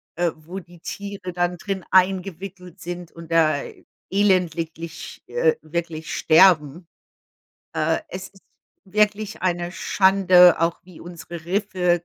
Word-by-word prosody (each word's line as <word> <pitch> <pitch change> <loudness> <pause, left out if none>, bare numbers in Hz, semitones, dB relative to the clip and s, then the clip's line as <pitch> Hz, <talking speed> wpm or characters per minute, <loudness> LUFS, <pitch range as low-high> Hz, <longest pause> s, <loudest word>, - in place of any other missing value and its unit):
äh, 175 -1 +1
wo 170 +5 -8
die 175 -1 -16
Tiere 200 -2 -6
dann 175 0 -1
drin 195 -1 -4
eingewickelt 185 -1 0
sind 175 0 -7
und 165 0 -12
da 155 -3 +3 0.5
elendig, 175 -4 -1
äh, 480 -1 +2
wirklich 160 0 -5
sterben. 165 -1 +4 0.9
Äh, 160 +1 +1
es 185 0 -7
ist 195 - -22 0.4
wirklich 210 0 0
eine 175 -1 -1
Schande, 185 -3 +5
auch 165 0 0
wie 180 -3 -15
unsere 170 -1 -9
Riffe 180 -2 0
175 Hz, 120 wpm, -22 LUFS, 170-190 Hz, 0.9 s, Schande